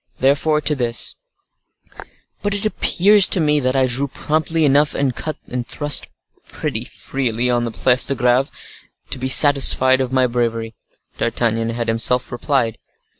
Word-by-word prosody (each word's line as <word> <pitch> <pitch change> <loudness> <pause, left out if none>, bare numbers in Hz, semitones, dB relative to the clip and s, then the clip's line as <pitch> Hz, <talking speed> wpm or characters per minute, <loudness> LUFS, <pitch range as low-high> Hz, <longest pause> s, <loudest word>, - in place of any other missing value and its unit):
Therefore 145 +3 +1
to 150 - +2
this:— 120 -4 -2 1.3
"But 205 -1 -2
it 205 - -4
appears 205 -1 +3
to - - +4
me 150 -2 +1
that 130 -1 -2
I 135 -1 +2
drew 130 +3 -2
promptly 155 +3 -2
enough, 145 +1 +2
and 135 -3 -2
cut 155 -2 -6
and 125 0 -6
thrust 145 +1 +1 0.4
pretty - - -5
freely 125 -2 -3
on 120 -1 -1
the 115 - -5
Place 125 +3 +1
de 140 - -1
Greve, 125 +2 +1 0.6
to - - 0
be 130 +1 -4
satisfied 130 -2 +5
of 130 -1 -4
my 130 -1 +2
bravery," 115 -2 -3 0.5
D'Artagnan 115 -1 -1
had 115 0 -4
himself 115 +2 0
replied. 120 -2 -2
130 Hz, 155 wpm, -18 LUFS, 120-145 Hz, 1.3 s, satisfied